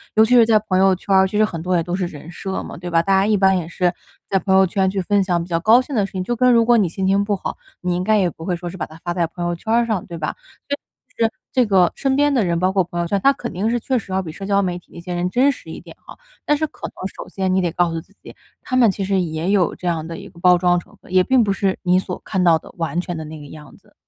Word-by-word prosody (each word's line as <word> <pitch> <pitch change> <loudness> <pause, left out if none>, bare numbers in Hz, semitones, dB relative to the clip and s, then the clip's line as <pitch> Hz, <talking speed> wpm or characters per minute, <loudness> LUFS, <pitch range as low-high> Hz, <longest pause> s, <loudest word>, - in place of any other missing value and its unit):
尤 220 - +6
其 250 +3 +3
是 235 - +7
在 220 -1 +4
朋 205 -3 -1
友 190 0 +4
圈 195 +2 -3
儿， 190 0 +5
其 200 - -7
实 215 - +5
很 175 -6 -5
多 180 +1 0
也 170 - +2
都 175 +2 -3
是 185 -1 -1
人 160 -1 -9
设 190 +1 -4
嘛， - - -8
对 175 +1 -6
吧？ 165 0 +4
大 195 +4 -2
家 195 0 +4
一 215 0 +2
般 190 -1 +3
也 170 -3 -4
是 180 +1 0 0.4
在 195 - +2
朋 190 0 +1
友 190 - +6
圈 190 +1 0
去 195 0 -2
分 200 +2 +2
享 175 -2 0
比 - - -10
较 165 - 0
高 220 +8 +5
兴 270 +1 -6
的 205 -3 +2
事 195 - -10
情， 185 -1 -3
就 240 +5 -2
跟 250 +2 +4
如 230 -1 +5
果 240 0 +5
你 200 -5 +3
心 190 +3 -2
情 195 +1 +3
不 205 0 0
好， - - -5 0.2
你 180 -1 -1
应 180 - -1
该 215 +2 +3
也 185 -3 +2
不 165 - -10
会 180 -1 -1
说 175 +1 -6
是 185 - -9
把 - - -3
它 155 - -14
发 175 - -2
在 170 -1 +1
朋 175 +1 -6
友 175 0 -1
圈 220 +6 -3
儿 235 0 +3
上， 215 -6 -2
对 170 - -8
吧？ 155 -1 -3 0.3
这 285 - -1 0.5
是 225 - 0 0.2
这 255 -2 +3
个 190 -4 +3
身 270 -1 0
边 290 +1 +3
的 245 -6 +2
人， 170 -1 0
包 185 +1 +2
括 190 -1 +2
朋 175 0 -6
友 170 - -2
圈， 200 +3 0
他 275 - +5
肯 245 -3 -6
定 195 +4 -1
是 240 +1 0
确 260 +2 -1
实 195 - -11
要 190 - 0
比 160 -4 -7
社 195 +4 -8
交 200 0 +2
媒 180 -2 -2
体 - - -30
那 170 - -9
些 180 +1 -6
人 175 +1 -1
真 260 +8 +3
实 270 - -11
一 - - -7
点 - - -14
哈， - - -14 0.3
但 295 - +3
是 310 +1 -1
可 - - -8
能 - - -14 0.2
首 - - -8
先 190 -1 -1
你 190 - +2
得 175 - 0
告 175 0 +1
诉 165 - -3
自 195 - -25
己， - - -12 0.3
他 255 - -4
们 245 -3 +5
其 195 - -4
实 195 0 +1
也 165 0 -2
有 190 -5 +2
这 180 - -6
样 160 -2 -1
的 165 - -6
一 - - -10
个 175 - -17
包 180 0 +5
装 175 0 +2
成 - - -17
分， - - -17
也 185 -1 +5
并 260 0 +3
不 200 - 0
是 195 -1 -1
你 180 0 +3
所 180 -1 -5
看 185 -2 -1
到 170 -2 +5
的 - - -14
完 170 +1 -2
全 175 -2 -5
的 160 - -6
那 155 0 -9
个 145 - -11
样 150 0 -13
子。 - - -27
190 Hz, 360 characters per minute, -20 LUFS, 175-210 Hz, 0.5 s, 是